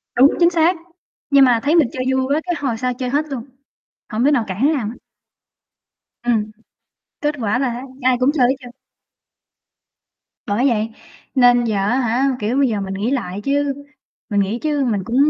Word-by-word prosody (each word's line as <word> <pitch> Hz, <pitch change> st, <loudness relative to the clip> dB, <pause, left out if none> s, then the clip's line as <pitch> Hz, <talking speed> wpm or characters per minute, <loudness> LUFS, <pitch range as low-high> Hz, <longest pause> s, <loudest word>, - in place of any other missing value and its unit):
Đúng, 265 Hz, +4 st, +7 dB
chính 340 Hz, 0 st, +6 dB
xác, 340 Hz, +1 st, +2 dB, 0.5 s
nhưng 275 Hz, -2 st, +6 dB
mà 240 Hz, -2 st, +3 dB
thấy 300 Hz, +4 st, +2 dB
mình 320 Hz, -7 st, +5 dB
chơi 255 Hz, -, -3 dB
vui 260 Hz, 0 st, +1 dB
quá 315 Hz, -, 0 dB
cái 350 Hz, -1 st, -1 dB
hồi 260 Hz, -6 st, -2 dB
sau 250 Hz, +1 st, -1 dB
chơi 250 Hz, 0 st, -4 dB
hết 290 Hz, +3 st, 0 dB
luôn, 260 Hz, -5 st, -4 dB, 0.7 s
hổng 230 Hz, +3 st, 0 dB
đứa 290 Hz, -, +4 dB
nào 250 Hz, -6 st, +2 dB
cản 190 Hz, +2 st, -5 dB
đứa 310 Hz, -, +3 dB
nào 245 Hz, -8 st, -2 dB
hết. 230 Hz, -, -7 dB, 1.3 s
Ừm, 220 Hz, -3 st, 0 dB, 0.7 s
kết 295 Hz, 0 st, 0 dB
quả 225 Hz, +1 st, 0 dB
là 270 Hz, -, +1 dB
á 240 Hz, +1 st, -5 dB, 0.2 s
ai 255 Hz, 0 st, +3 dB
cũng 255 Hz, +2 st, +3 dB
chơi 255 Hz, -6 st, +3 dB
hết 270 Hz, -, +1 dB
trơn. 245 Hz, -2 st, -11 dB, 1.7 s
Bởi 230 Hz, +7 st, +1 dB
vậy 220 Hz, -2 st, 0 dB, 0.5 s
nên 245 Hz, -1 st, +5 dB
giờ 220 Hz, -2 st, -1 dB
á 205 Hz, +7 st, +1 dB
hả, 245 Hz, +2 st, +1 dB
kiểu, 220 Hz, +5 st, -1 dB
bây 275 Hz, -1 st, +4 dB
giờ 210 Hz, -3 st, -2 dB
mình 195 Hz, 0 st, -4 dB
nghĩ 205 Hz, +6 st, -2 dB
lại 205 Hz, -7 st, -3 dB
chứ, 280 Hz, +1 st, 0 dB, 0.6 s
mình 205 Hz, -, +2 dB
nghĩ 200 Hz, +4 st, -1 dB
chứ 295 Hz, -3 st, 0 dB
mình 215 Hz, -5 st, 0 dB
cũng 235 Hz, +5 st, -3 dB
250 Hz, 200 wpm, -19 LUFS, 225-280 Hz, 1.7 s, Đúng